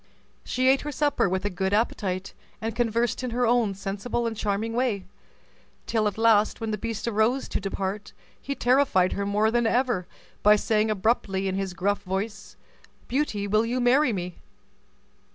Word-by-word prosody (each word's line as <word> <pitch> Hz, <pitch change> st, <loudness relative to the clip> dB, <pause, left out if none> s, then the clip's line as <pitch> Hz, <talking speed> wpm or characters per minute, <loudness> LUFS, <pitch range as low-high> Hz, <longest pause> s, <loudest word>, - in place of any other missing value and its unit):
She 255 Hz, +1 st, 0 dB
ate 265 Hz, +1 st, +4 dB
her 295 Hz, -, -4 dB
supper 290 Hz, -8 st, +1 dB
with 190 Hz, +1 st, -2 dB
a -, -, +1 dB
good 190 Hz, +2 st, -1 dB
appetite, 195 Hz, -4 st, -1 dB, 0.3 s
and 225 Hz, 0 st, -4 dB
conversed 235 Hz, 0 st, 0 dB
in 250 Hz, -, -2 dB
her 245 Hz, +1 st, 0 dB
own 230 Hz, -4 st, +2 dB
sensible 200 Hz, +5 st, -3 dB
and 230 Hz, -1 st, -2 dB
charming 215 Hz, +2 st, -2 dB
way, 235 Hz, -5 st, 0 dB, 0.8 s
till 220 Hz, -2 st, +1 dB
at 205 Hz, -, -3 dB
last, 220 Hz, -2 st, +3 dB
when 225 Hz, -1 st, -3 dB
the 215 Hz, -, -1 dB
beast 225 Hz, -1 st, -4 dB
rose 235 Hz, +4 st, +1 dB
to -, -, -1 dB
depart, 195 Hz, +1 st, -4 dB, 0.3 s
he 280 Hz, -, -4 dB
terrified 245 Hz, -9 st, +3 dB
her 200 Hz, 0 st, -2 dB
more 210 Hz, +2 st, +2 dB
than 240 Hz, 0 st, +2 dB
ever 240 Hz, -7 st, +1 dB, 0.3 s
by 210 Hz, +1 st, +6 dB
saying 215 Hz, +1 st, +1 dB
abruptly, 195 Hz, -2 st, 0 dB
in 190 Hz, -, -1 dB
his 190 Hz, -1 st, -3 dB
gruff 200 Hz, +2 st, 0 dB
voice, 200 Hz, +3 st, -4 dB, 0.5 s
"Beauty, 245 Hz, -7 st, -1 dB
will 215 Hz, +2 st, +2 dB
you 240 Hz, +2 st, -1 dB
marry 255 Hz, +3 st, +4 dB
me?" 180 Hz, -3 st, -4 dB
215 Hz, 170 wpm, -26 LUFS, 195-240 Hz, 0.8 s, by